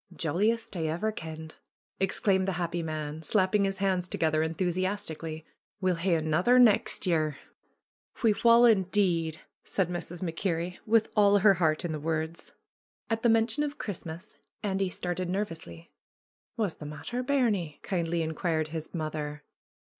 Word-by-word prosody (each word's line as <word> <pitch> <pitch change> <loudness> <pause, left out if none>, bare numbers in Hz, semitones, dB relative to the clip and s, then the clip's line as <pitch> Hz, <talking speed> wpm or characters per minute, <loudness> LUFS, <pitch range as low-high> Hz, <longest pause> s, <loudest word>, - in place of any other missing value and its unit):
^^Jolliest 200 +9 0
I 160 -2 -1
ever 175 +8 -1
kenned!" 160 -4 -8 0.4
exclaimed 190 0 +1
the 195 - 0
happy 175 0 -2
man, 155 -1 -4
slapping 195 +4 +2
his 195 0 -2
hands 190 -2 0
together 155 -3 +1
enthusiastically. 165 -1 -2 0.3
^'We'll 185 -3 +1
hae 170 +1 +2
anither 160 +10 +3
nex' 235 -5 +4
year." 155 -5 +1 0.8
^^We 220 -3 +1
wull, 235 0 +7
indeed 185 -6 +2
!" - - -65
said 185 -3 +1
Mrs. 175 0 -5
MacKerrie, 175 0 -2
with 220 0 +3
all 205 -1 +5
her 200 0 +6
heart 160 -3 +1
in 170 - -2
the 155 - -3
words. 160 +1 -3 0.6
At 225 0 0
the 235 - +3
mention 225 +5 +3
of 295 0 -2
Christmas 170 - -7 0.3
Andy 195 -2 0
started 180 0 -3
nervously. 165 - -5 0.7
^^Wha's 210 -7 -1
the 150 - -8
matter, 150 +12 -4
bairnie?" 220 - 0
kindly 170 -2 -1
inquired 160 0 -1
his 160 0 -6
mother. 150 -2 -4
175 Hz, 145 wpm, -29 LUFS, 160-205 Hz, 0.8 s, wull